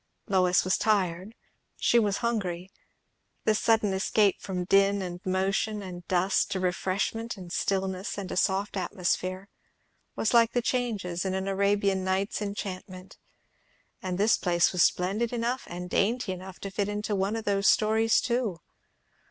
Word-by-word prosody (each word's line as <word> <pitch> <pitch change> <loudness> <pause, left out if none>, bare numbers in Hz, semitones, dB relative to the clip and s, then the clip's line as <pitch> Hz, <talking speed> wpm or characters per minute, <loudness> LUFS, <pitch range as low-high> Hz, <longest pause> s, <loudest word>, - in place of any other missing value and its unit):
Lois 185 -3 +3
was 185 +1 +1
tired, 195 -1 0 0.4
she 235 - +4
was 205 -3 +1
hungry; 190 -5 -2 0.7
this 215 -1 +3
sudden 220 -3 +2
escape 200 +1 +2
from 185 -2 -3
din 195 +2 +3
and 180 -1 -6
motion 195 +3 0
and 175 -2 -9
dust, 185 +1 +2
to 190 - -2
refreshment 190 +5 -2
and 180 -2 -10
stillness 190 0 -1
and 195 -2 -5
a - - -3
soft 195 +2 0
atmosphere, 185 0 -2 0.7
was 220 - 0
like 235 -1 +5
the 245 - +2
changes 210 -9 -1
in 190 -1 -1
an 190 0 -2
Arabian 200 0 +1
Nights' 190 +3 -1
enchantment. 190 -2 -6 0.8
And 185 -2 -3
the 210 +3 +4
place 175 -2 +3
was 180 - +1
splendid 200 +8 +1
enough 245 +2 -2
and 180 +1 -6
dainty 215 +3 0
enough 185 0 -8
to 195 - -5
fit 200 +1 -1
into 210 +1 -2
one 195 +3 0
of 225 - -4
those 200 0 +1
stories 220 +1 +3
too. 235 -7 -1
195 Hz, 150 wpm, -28 LUFS, 185-215 Hz, 0.8 s, like